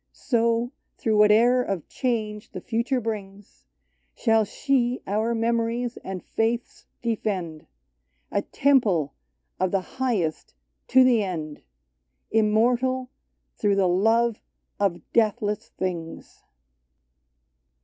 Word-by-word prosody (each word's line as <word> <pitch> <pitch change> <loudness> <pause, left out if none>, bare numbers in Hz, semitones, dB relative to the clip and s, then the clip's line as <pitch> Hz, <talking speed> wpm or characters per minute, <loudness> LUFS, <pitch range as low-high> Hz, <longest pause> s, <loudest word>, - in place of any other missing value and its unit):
So, 235 0 0 0.3
through 220 -2 +1
whate'er 225 +4 +5
of 195 -9 -3
change 215 -4 -3
the - - -5
future 240 +3 -1
brings. 205 - -7 0.5
Shall 225 -1 +3
she 250 +2 0
our 220 +4 0
memories 230 +1 0
and 190 -1 -6
faiths 230 +2 -2 0.2
defend, 190 -9 -3 0.3
— - - -48 0.3
A 200 - +1
temple 210 - +2 0.5
of 185 0 +2
the 195 +7 -3
highest 190 - -1 0.3
to 260 0 +6
the 240 -4 +4
end. 155 -6 -5 0.7
Immortal 245 +4 +2 0.4
through 205 -2 +1
the 195 -2 +3
love 225 +5 +2 0.4
of 195 -4 0
deathless 210 -2 +1
things 170 -3 -5
220 Hz, 105 wpm, -25 LUFS, 195-235 Hz, 0.7 s, to